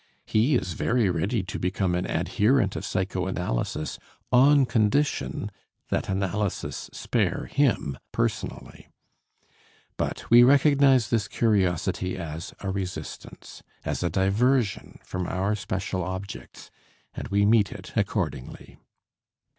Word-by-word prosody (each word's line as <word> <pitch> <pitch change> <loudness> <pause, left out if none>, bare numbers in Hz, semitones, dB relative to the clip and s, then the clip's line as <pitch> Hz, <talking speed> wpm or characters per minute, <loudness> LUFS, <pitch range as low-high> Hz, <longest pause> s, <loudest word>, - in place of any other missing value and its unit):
He 120 +7 +2
is 90 -8 -1
very 115 +3 +1
ready 100 +6 0
to 95 - -5
become 90 0 0
an 90 +1 -1
adherent 105 -2 +2
of - - -4
psychoanalysis 90 -7 -2 0.3
on 135 +2 +6
condition 125 +5 0 0.4
that - - -1
analysis 95 +1 -2
spare - - -1
him 120 - 0
personally. - - -3 1.1
But - - -3
we 120 +1 +9
recognize 135 -3 +5
this 110 -5 +1
curiosity 95 -4 0
as 80 -2 -6
a 95 - -2
resistance, 90 -5 -7 0.2
as - - -2
a 90 - +1
diversion 105 +4 +1
from 90 -1 -4
our 95 +3 0
special 95 -2 -3
objects, 95 +2 -7 0.4
and - - -6
we 100 +1 +2
meet 105 -1 +4
it - - -10
accordingly. 65 - -3
100 Hz, 115 wpm, -26 LUFS, 90-120 Hz, 1.1 s, we